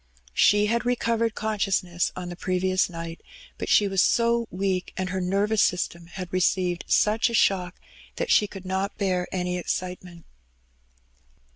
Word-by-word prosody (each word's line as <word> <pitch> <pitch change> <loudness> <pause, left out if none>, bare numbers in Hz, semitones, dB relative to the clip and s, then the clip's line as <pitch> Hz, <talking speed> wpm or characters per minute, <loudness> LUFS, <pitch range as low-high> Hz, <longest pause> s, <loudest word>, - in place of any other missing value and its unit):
She 205 - +4
had 235 +2 0
recovered 230 -2 0
conscious 210 -3 0
ness 175 0 -1
on 180 -1 -6
the 175 - -6
previous 185 +1 0
nighty 165 -1 -7 0.4
but - - -4
she 205 - +5
was 195 -1 +2
so 235 +1 +2
weak^ 185 0 -1
and 185 0 -2
her 190 0 -2
nervous 200 +4 +1
system 170 -1 0
had 180 0 -8
received 180 -1 +1
such 220 +3 +3
a 235 - -2
shocks 180 -4 +1 0.4
that - - -2
she 210 - +5
could 195 -2 -10
not 190 +2 -2
bear 185 -3 0
any 180 -1 -2
excitement. 180 -1 -5
185 Hz, 155 wpm, -25 LUFS, 180-210 Hz, 0.4 s, she